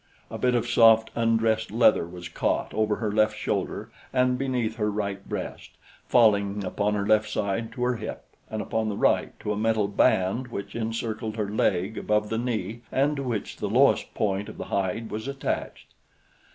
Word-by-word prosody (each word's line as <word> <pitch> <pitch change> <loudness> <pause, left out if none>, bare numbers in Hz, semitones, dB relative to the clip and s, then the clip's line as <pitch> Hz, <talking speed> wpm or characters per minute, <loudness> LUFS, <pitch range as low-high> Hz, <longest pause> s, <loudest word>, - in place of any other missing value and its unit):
A - - -5
bit 125 -1 +2
of 120 0 0
soft, 115 -1 +5
undressed 115 -1 +1
leather 110 -6 +4
was 90 0 -8
caught 85 - -1
over 110 -1 +1
her 110 -1 -2
left 110 0 +2
shoulder - - -3 0.2
and 125 -1 +2
beneath 125 -4 -1
her 105 -2 0
right 100 -2 -3
breast, - - -6 0.3
falling 100 -4 +3
upon 100 +3 0
her 100 -1 -1
left 110 0 +3
side 105 +2 -2
to 125 - -3
her 125 -1 +1
hip - - -6 0.2
and 110 -1 -3
upon 110 -1 -1
the 100 - -3
right - - +1
to 105 - -2
a - - -3
metal 110 -1 +1
band 100 +4 +2
which 100 -4 -6
encircled 110 -1 -3
her 105 -2 -1
leg 100 0 0
above 105 0 0
the 115 - -1
knee 115 -2 -3
and 145 +2 +1
to - - -2
which 115 -6 -3
the - - -3
lowest - - +3
point 100 0 -1
of - - -10
the - - -5
hide 100 +4 -1
was 110 +4 -4
attached. 140 -1 -4
110 Hz, 185 wpm, -26 LUFS, 105-115 Hz, 0.3 s, soft